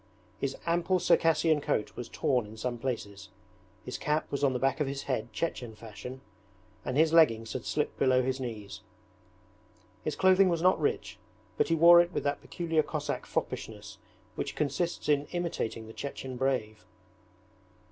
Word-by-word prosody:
His 140 -1 -2
ample 175 +2 +2
Circassian 165 -3 +3
coat 105 -6 -1
was 120 - -6
torn 125 -5 0
in 110 +1 -11
some 120 +1 -3
places, 100 -7 -4 0.6
his 125 - -5
cap 150 +1 -1
was 140 0 -2
on 140 - +4
the - - 0
back 135 +4 +1
of 150 - +1
his 140 0 -4
head 120 -3 -2
Chechen 125 -9 -3
fashion, 115 +4 -9 0.6
and 130 - -2
his 160 +1 +4
leggings 115 -9 +4
had 130 - -5
slipped 150 - -2
below 130 -1 +4
his 130 +1 -1
knees. 105 -6 -6 1.2
His 155 - -2
clothing 190 0 +5
was 170 -1 0
not 185 +1 +4
rich, 435 +1 -1 0.4
but - - +2
he 165 - +2
wore 170 +2 +8
it 175 0 -2
with - - -2
that 140 0 -1
peculiar 165 -2 0
Cossack - - -4
foppishness - - -4 0.3
which - - -4
consists 155 +4 -1
in 145 -1 +2
imitating 170 -10 -3
the 110 - -11
Chechen 135 -1 -6
brave. 120 -5 -1
135 Hz, 165 wpm, -30 LUFS, 120-165 Hz, 1.2 s, wore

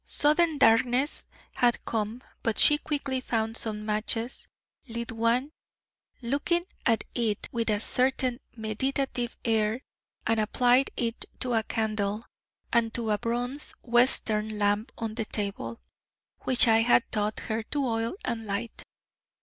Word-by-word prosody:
Sudden 305 +1 +3
darkness 245 +4 +3 0.3
had 240 -2 +2
come, 225 +2 -3 0.2
but 225 -2 0
she 295 0 +6
quickly 280 -4 -2
found 225 -2 -1
some 210 -2 -2
matches, 225 +3 -1 0.4
lit 235 0 -4
one, 230 +5 +1 0.7
looking 290 +8 +1 0.2
at 230 -2 +3
it 220 -4 -1
with 230 -1 -1
a 210 -1 +2
certain 255 +1 +1 0.2
meditative 240 +2 -2
air, 225 +2 +1 0.4
and 225 -1 +2
applied 245 +4 +3
it 230 -1 -1 0.2
to 250 -1 0
a 225 - +3
candle 215 -1 -2 0.5
and 230 -1 +3
to 230 -2 -1
a 210 - +1
bronze 245 +4 -2
Western 220 -3 +2
lamp 205 +3 +1
on 225 -1 -3
the 225 -1 -2
table, 210 +2 -4 0.7
which 255 -1 +5
I 225 0 +5
had 240 +1 +4
taught 210 0 -1
her 220 0 -2
to 280 +5 -2
oil 230 -1 -1
and 225 -3 -3
light. 210 +3 -3
230 Hz, 135 wpm, -28 LUFS, 220-250 Hz, 0.7 s, she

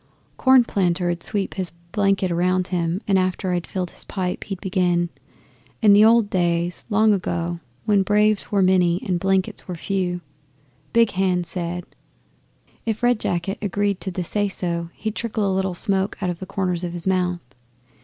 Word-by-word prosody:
Cornplanter 190 -9 +3
'ud 170 0 -4
sweep 200 0 -2
his 185 -2 -2 0.2
blanket 195 -2 +1
round 180 +2 +1
him, 175 +1 -1
and 195 -2 +4
after 185 0 -1
I'd 175 -1 -2
filled 180 -2 -3
his - - -7
pipe 185 -2 -3
he'd 195 -3 -5
begin 180 -3 +1 0.7
"In 210 -2 +7
the 205 +1 +7
old 225 -1 +5
days, 175 -1 0
long 215 0 +4
ago, 170 -2 -2 0.3
when 205 -2 +4
braves 210 +1 +2
were 200 -2 +3
many 180 -1 +3
and 180 -2 0
blankets 190 0 0
were 180 - -4
few, 180 0 -2 0.7
Big 230 -2 +4
Hand 180 -2 +1
said 175 0 -4 0.5
" - - -36
If 220 +1 -2
Red 245 -2 +3
Jacket 175 +1 -2
agreed 205 -1 -1
to 195 - -2
the 185 0 -3
say 205 +3 0
so 170 -3 -3
he'd 220 -1 -3
trickle 220 -2 -2
a 190 - +1
little 190 -1 -1
smoke 195 0 0
out 185 -3 -1
of 170 - -7
the 190 - -7
corners 185 -3 -1
of 175 -1 -3
his 175 -1 -6
mouth. 180 -2 0
185 Hz, 175 wpm, -22 LUFS, 175-200 Hz, 0.7 s, In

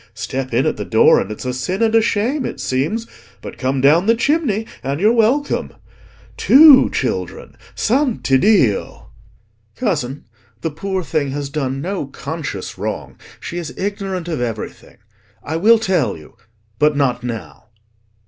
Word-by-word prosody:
Step 130 +4 -4
in 120 +3 +1
at - - 0
the - - -3
door - - +4
and 105 - -4
it's 105 - -7
a 125 - -2
sin 180 - -2
and 225 -1 +2
a 225 - +5
shame, 230 +6 0
it - - -5
seems; 155 - -1 0.3
but - - -10
come 130 0 -1
down 160 +8 +4
the 230 - +5
chimney 235 -4 0 0.2
and 140 +3 -3
you're 215 +5 +4
welcome. 245 +6 +1 0.7
Two 285 -1 +7
children—Santiddio!" 210 - 0 0.7
"Cousin, 145 - -2 0.4
the 165 - -2
poor 190 +4 -3
thing 155 -4 -1
has 140 0 -4
done 135 -3 -2
no 185 -3 -3
conscious 140 - -6
wrong: - - -5 0.2
she 175 - -5
is 170 - -7
ignorant 195 -3 -3
of 160 -7 -3
everything. 115 -3 -6 0.5
I 160 +2 -3
will 225 +7 +5
tell 190 - 0
you—but 110 - -4
not 125 -4 0
now." 100 - -7
160 Hz, 145 wpm, -18 LUFS, 130-215 Hz, 0.7 s, Two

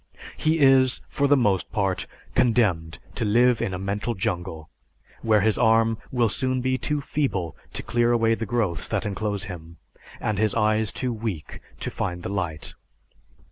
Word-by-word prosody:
He 160 +1 +1
is, 135 -3 +5
for 140 - +1
the 145 0 +5
most 100 -7 +1
part, 95 -3 -1 0.3
condemned 95 -10 +2 0.2
to 120 - -2
live 120 +2 +3
in 115 -4 -1
a 90 - -3
mental 100 +4 -2
jungle 85 -4 -3 0.5
where 110 -2 +3
his 110 +1 +2
arm 115 -1 +3
will 120 -2 +2
soon 130 +4 -1
be 130 +1 0
too 150 +3 -1
feeble 115 - -2 0.2
to - - -4
clear 120 0 +2
away 115 -1 +3
the 115 -1 -3
growths 105 -7 -1
that - - -2
enclose 105 0 -2
him, 85 -3 -9 0.4
and 105 -2 -1
his 110 -1 +2
eyes 110 -1 +2
too 125 -2 -2
weak 105 -9 -5 0.2
to - - -3
find 90 0 -3
the - - -4
light." 90 -6 -4
110 Hz, 170 wpm, -25 LUFS, 95-120 Hz, 0.5 s, is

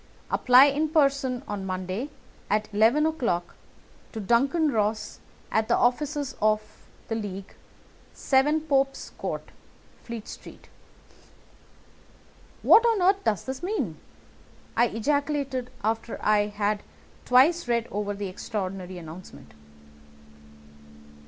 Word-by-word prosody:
Apply 250 +2 +7
in 290 +2 +1
person 275 -4 +1
on 205 -2 -4
Monday, 185 +7 -4 0.4
at 210 +1 +1
eleven 230 +9 +4
o'clock, 235 - -1 0.6
to 220 - -6
Duncan 275 - +2
Ross, 215 -1 -1 0.3
at 220 0 +1
the - - +3
offices 285 +3 0
of 215 0 +3 0.5
the - - -3
League, 200 -3 -5 0.6
7 295 +3 +2
Pope's 275 -3 0
Court, - - -5 0.5
Fleet 230 -2 -7
Street." - - -12 1.9
"What 455 - +7
on 460 -3 +3
earth 390 +2 +3
does 215 -3 0
this 265 0 -5
mean?" 345 - -2 0.8
I 240 +1 +4
ejaculated 275 +1 -1
after 225 +2 -2
I 210 -1 +3
had 205 0 -1 0.4
twice 275 +6 +4
read 235 -1 0
over 205 0 -2
the 200 0 -4
extraordinary 185 -1 -5
announcement. 170 +2 -11
235 Hz, 110 wpm, -26 LUFS, 205-280 Hz, 1.9 s, Apply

